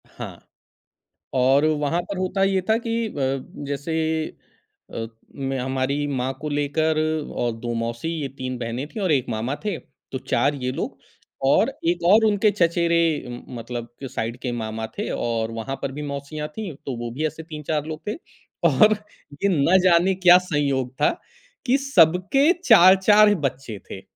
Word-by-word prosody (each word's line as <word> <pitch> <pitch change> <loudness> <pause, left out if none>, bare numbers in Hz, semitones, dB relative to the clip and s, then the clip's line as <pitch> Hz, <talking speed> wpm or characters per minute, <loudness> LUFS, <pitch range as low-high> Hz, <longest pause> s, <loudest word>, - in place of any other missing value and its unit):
हाँ - - -9 1.0
और 135 +4 +4
वहाँ 155 +2 +1
पर 195 +2 -6
होता 185 +1 0
ये 195 -1 +2
था 220 - +5
कि 230 0 -1
अ, - - -9 0.5
जैसे 140 +3 -3 1.0
अ, 115 - -3 0.3
मैं 135 -1 -3
हमारी 130 +3 -1
माँ 130 -2 -2
को 150 - -3
लेकर 145 +2 0 0.4
और 120 - 0
2 120 +1 -3
मौसी 115 +5 -3
ये 140 - -2
3 130 -1 -4
बहनें 120 +3 -4
थी 215 - -8
और 190 -4 +1
1 135 -4 +2
मामा 115 +4 -2
थे। 205 -5 -1 0.3
तो 130 - -2
4 145 +2 +1
ये 125 - 0
लोग 130 - -4 0.5
और 215 - +4 0.2
1 170 0 0
और 220 +2 +6
उनके 210 0 +3
चचेरे 170 -2 +2 0.3
म 120 0 -7 0.2
मतलब 120 0 -6
जो 135 - -4
साइड 115 0 -4
के 125 - -2
मामा 110 -1 -4
थे - - -2
और 115 -1 -1
वहाँ 115 +4 -4
पर 140 - -2
भी 145 +3 -6
मौसियाँ 140 +2 -5
थी, 190 +2 -6
तो 135 - -3
वो 120 0 -5
भी 155 +5 -2
ऐसे 160 +1 -8
3-4 150 -2 -3
लोग 155 -1 -6
थे 210 - -1 0.5
और 215 0 +5 0.5
ये 200 - +4 0.2
ना 185 +3 +5
जाने 185 +1 +4
क्या 180 -1 +7
संयोग 140 -8 -1
था - - +5 0.6
कि 265 +1 +3
सब 180 - +4 0.4
4-4 205 +1 +7
बच्चे 130 -5 -4
थे। 95 - -7
145 Hz, 170 wpm, -23 LUFS, 130-180 Hz, 1.0 s, क्या